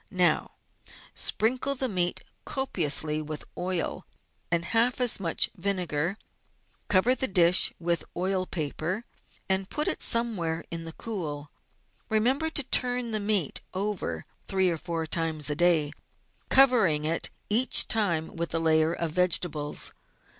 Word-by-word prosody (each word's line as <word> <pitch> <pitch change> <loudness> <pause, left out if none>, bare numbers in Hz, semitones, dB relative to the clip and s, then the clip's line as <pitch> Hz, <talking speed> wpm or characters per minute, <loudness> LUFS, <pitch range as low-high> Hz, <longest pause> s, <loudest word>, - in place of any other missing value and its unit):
Now - - +1 0.6
sprinkle 255 +5 0
the 260 0 0
meat 180 -5 -1 0.2
copiously 155 - 0
with 155 0 -6
oil 180 -2 -3 0.4
and 170 0 0
half 235 +5 +1
as 245 -4 +2
much 170 -4 0
vinegar; 180 -2 -2 0.7
cover 205 +6 +3
the 260 +1 0
dish 180 -1 +5
with 170 -1 0
oil 185 +1 -1
paper, 165 +6 -4 0.4
and 190 0 -1
put 300 - 0
it - - +1
somewhere 185 -9 +1
in 165 -1 -5
the 165 - -8
cool. 150 -10 -6 0.6
Remember 250 +8 +1
to 300 -2 0
turn 245 -2 +1
the 215 - -1
meat 205 -7 0
over 185 - -3 0.2
three 190 -2 +1
or 165 - -4
four 165 -1 -4
times 160 -2 +1
a - - -1
day, 165 -3 +3 0.6
covering 225 - +4
it 165 +2 -1 0.2
each 235 +5 +5
time 175 -8 0
with 170 0 -3
a - - +1
layer 160 0 +2
of 170 -2 -3
vegetables. 170 -4 +1
180 Hz, 135 wpm, -27 LUFS, 160-220 Hz, 0.7 s, dish